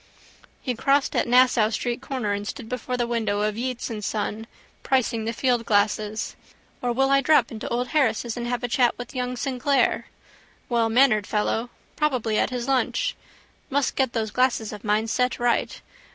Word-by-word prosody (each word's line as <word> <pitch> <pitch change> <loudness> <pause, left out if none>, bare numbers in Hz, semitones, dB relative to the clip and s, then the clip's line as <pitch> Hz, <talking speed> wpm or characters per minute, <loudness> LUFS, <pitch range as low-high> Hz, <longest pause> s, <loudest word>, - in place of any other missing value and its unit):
He 255 - -1
crossed 275 +4 +1
at - - +1
Nassau 245 -3 +5
street 240 +2 -2
corner 260 -6 -3
and 205 0 -4
stood 220 - -6
before 250 +1 -3
the 240 - +1
window 220 -4 -1
of 210 0 0
Yeates 250 +1 -3
and 210 -2 -5
Son, 215 +1 -3 0.3
pricing 240 -4 0
the 225 - -1
fieldglasses. 220 -3 0 0.5
Or 245 - 0
will 270 +3 +2
I 275 0 +5
drop 275 -4 +4
into 220 -2 -6
old 245 +1 -1
Harris's 240 -6 +1
and 240 0 -4
have 245 0 -2
a - - 0
chat 245 0 +2
with 245 +3 -8
young 250 -1 -3
Sinclair? 270 +2 +1 0.6
Wellmannered 230 -2 +3
fellow. 225 +2 -1 0.3
Probably 250 -8 0
at - - +1
his 250 -1 -4
lunch. 265 -2 0 0.5
Must 280 -1 0
get 265 -3 +1
those 220 -2 -1
old - - -17
glasses 250 -4 +1
of 210 - -9
mine 215 +1 +1
set 250 +2 0
right. 240 -1 0
240 Hz, 175 wpm, -24 LUFS, 220-255 Hz, 0.6 s, Nassau